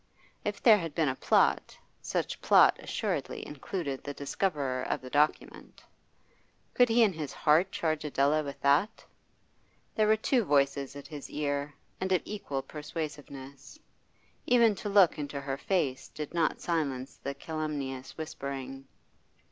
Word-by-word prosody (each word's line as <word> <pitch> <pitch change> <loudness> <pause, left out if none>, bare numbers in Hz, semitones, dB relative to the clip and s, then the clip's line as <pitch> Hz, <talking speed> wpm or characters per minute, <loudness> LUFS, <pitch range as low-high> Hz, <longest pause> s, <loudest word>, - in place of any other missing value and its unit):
If 210 -2 -4
there 220 -3 +7
had 165 -4 -5
been 160 -4 +2
a 130 - -2
plot, - - +2 0.2
such - - -3
plot - - +6
assuredly - - -3
included 145 -1 -5
the 145 -1 -6
discoverer 140 -4 -1
of - - -2
the 130 0 -11
document. 150 +1 -1 0.9
Could 245 -1 +4
he 230 +1 +5
in 205 -4 +3
his 155 -4 -5
heart 165 +5 +3
charge 155 -2 -1
Adela 145 +1 +2
with 140 -2 -7
that? 145 +9 +2 0.9
There 215 -1 +2
were 215 - +5
two 240 +2 +2
voices 140 -3 +1
at 140 - -9
his 145 -3 -8
ear, 145 -1 -2 0.2
and 190 0 -2
of 185 - +2
equal 145 -10 -4
persuasiveness. 145 - -7 0.7
Even 235 -3 +5
to 205 +1 -5
look 195 -6 +5
into 145 -1 -4
her 140 -1 -3
face 145 -9 -1
did 150 0 -7
not 165 -2 0
silence 140 -6 -2
the 140 0 -4
calumnious 145 -4 -5
whispering. 135 -3 -6
150 Hz, 145 wpm, -30 LUFS, 140-175 Hz, 0.9 s, there